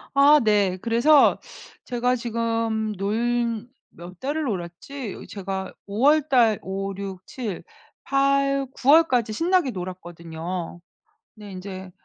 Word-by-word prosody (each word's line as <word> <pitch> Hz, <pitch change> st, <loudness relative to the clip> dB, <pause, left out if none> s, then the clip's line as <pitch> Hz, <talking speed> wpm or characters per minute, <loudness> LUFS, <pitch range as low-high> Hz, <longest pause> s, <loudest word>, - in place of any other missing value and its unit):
아 285 Hz, +2 st, +7 dB
네. 205 Hz, -4 st, +2 dB
그래서 240 Hz, +6 st, +4 dB, 0.5 s
제가 245 Hz, 0 st, 0 dB
지금 230 Hz, -2 st, -1 dB
놀 230 Hz, +3 st, -1 dB, 0.3 s
몇 175 Hz, +1 st, -11 dB
달을 295 Hz, +4 st, -2 dB
놀았지? 205 Hz, -, -6 dB
제가 190 Hz, -1 st, -5 dB
5 205 Hz, +3 st, -4 dB
월 305 Hz, +2 st, +6 dB
달 230 Hz, -5 st, +4 dB
5, 195 Hz, +1 st, -4 dB
6, 190 Hz, -1 st, -7 dB
7, 225 Hz, -8 st, -6 dB, 0.4 s
8, 275 Hz, 0 st, +2 dB
9 265 Hz, -, -2 dB
월까지 260 Hz, -8 st, +4 dB
신나게 340 Hz, -, +1 dB
놀았거든요. 175 Hz, -2 st, -6 dB, 0.6 s
네 210 Hz, -2 st, -11 dB
인제 185 Hz, 0 st, -8 dB
220 Hz, 170 characters per minute, -24 LUFS, 190-260 Hz, 0.6 s, 아